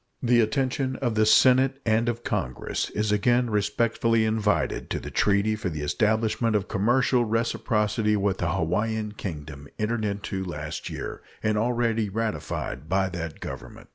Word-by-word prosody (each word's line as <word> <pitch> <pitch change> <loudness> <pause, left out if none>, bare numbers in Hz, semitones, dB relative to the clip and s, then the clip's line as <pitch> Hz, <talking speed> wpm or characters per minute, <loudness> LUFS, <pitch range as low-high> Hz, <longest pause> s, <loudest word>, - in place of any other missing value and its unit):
The 120 -1 +4
attention 130 +3 0
of 125 -3 -1
the 110 0 +3
Senate 130 +3 +5
and 115 +1 +2
of 120 0 -4
Congress 65 0 -2
is 105 0 -1
again 120 +3 +2
respectfully 110 +2 +1
invited 110 -1 0
to - - -2
the - - -8
treaty 105 +1 +2
for 105 -3 -3
the 75 -3 -5
establishment 110 +6 +1
of 100 -3 0
commercial 120 +4 +2
reciprocity 110 -1 0
with 100 -2 0
the 85 -1 0
Hawaiian 105 +5 -1
Kingdom 75 -8 -7
entered 110 +1 -1
into 100 -2 -3
last 75 -4 -5
year, - - -6 0.2
and 110 0 +1
already 115 -1 +1
ratified 105 -7 -3
by 95 0 +2
that 85 -3 -6
Government. - - -8
110 Hz, 150 wpm, -26 LUFS, 100-115 Hz, 0.2 s, Senate